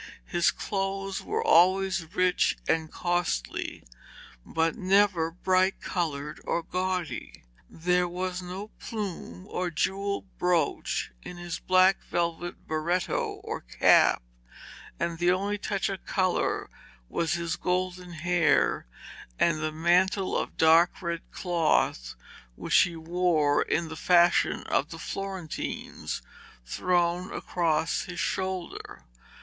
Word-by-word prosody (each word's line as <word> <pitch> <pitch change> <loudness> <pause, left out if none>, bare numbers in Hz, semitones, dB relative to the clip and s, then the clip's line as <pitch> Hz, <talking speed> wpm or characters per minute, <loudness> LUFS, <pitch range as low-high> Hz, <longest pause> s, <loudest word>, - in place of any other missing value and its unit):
His 175 -1 +2
clothes 195 -1 -3
were 445 +2 -2
always 185 - +3
rich 185 -2 +2
and 160 -1 0
costly, 175 - -2 0.6
but 165 - 0
never 190 -4 +3
bright 185 +2 +1
coloured 150 -4 -3
or 170 - -1
gaudy. 185 -1 -3 0.3
There 180 +2 +1
was 180 +1 -3
no 185 +4 -7
plume 185 - -6
or 180 -1 -2
jewelled 195 +5 -1
brooch 180 -2 0
in 180 - -9
his 175 0 -5
black 185 +1 +4
velvet 170 0 -3
beretto 160 +2 -1
or - - -4
cap, - - +4 0.8
and 170 -1 -2
the 175 0 +3
only 200 +3 0
touch 200 -1 -1
of 195 -2 -5
colour 185 -2 0 0.4
was 160 - -1
his 170 -1 -1
golden 180 -1 -2
hair, 170 - +2 0.5
and 165 -2 +2
the 155 0 -1
mantle 180 +4 +2
of - - -2
dark 165 +2 +5
red 170 -1 -2
cloth 165 - 0 0.4
which - - -1
he 170 -2 +5
wore 165 -3 +2
in 165 0 0
the 160 - -6
fashion 175 +1 +3
of 145 - 0
the 165 - -8
Florentines, 190 -1 -5 0.4
thrown 175 - 0
across 165 -2 0
his 180 -1 -7
shoulder. 185 -2 -3
175 Hz, 115 wpm, -28 LUFS, 165-185 Hz, 0.8 s, dark